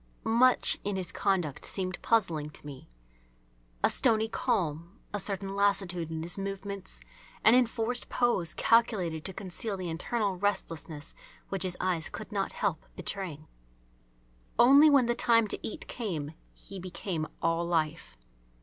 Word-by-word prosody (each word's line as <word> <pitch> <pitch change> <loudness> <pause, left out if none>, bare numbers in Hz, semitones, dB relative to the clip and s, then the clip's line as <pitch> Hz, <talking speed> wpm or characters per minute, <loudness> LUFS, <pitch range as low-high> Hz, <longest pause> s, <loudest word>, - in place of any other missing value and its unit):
Much 245 +3 +4
in 205 -1 -1
his 185 -3 -4
conduct 180 -8 0
seemed 185 -2 -2
puzzling 170 -10 +1
to 150 - -12
me. 140 - -10 0.9
A - - +5
stony 220 -3 +3
calm, 170 - -1 0.2
a 205 - -1
certain 195 0 -3
lassitude 190 -4 +1
in 160 0 -4
his 175 +4 -1
movements, 195 - -5 0.4
an 220 - +7
enforced 245 -1 +2
pose 215 -10 +1
calculated 195 -9 +2
to - - -3
conceal 195 +2 -4
the 180 -3 -4
internal 200 +3 -1
restlessness 165 -6 -3 0.4
which 195 -2 -3
his 180 -1 -1
eyes 175 -4 0
could 215 - -8
not 200 -2 -1
help 190 -7 -1
betraying. 170 -6 -4 1.1
Only 280 +5 +8
when 275 -4 +5
the 240 - +2
time 230 -2 +3
to - - -2
eat - - -5
came 165 - -4 0.2
he 195 - -9
became 180 -3 -4
all 165 0 +1
life. 155 - -1
190 Hz, 140 wpm, -30 LUFS, 165-220 Hz, 1.1 s, Only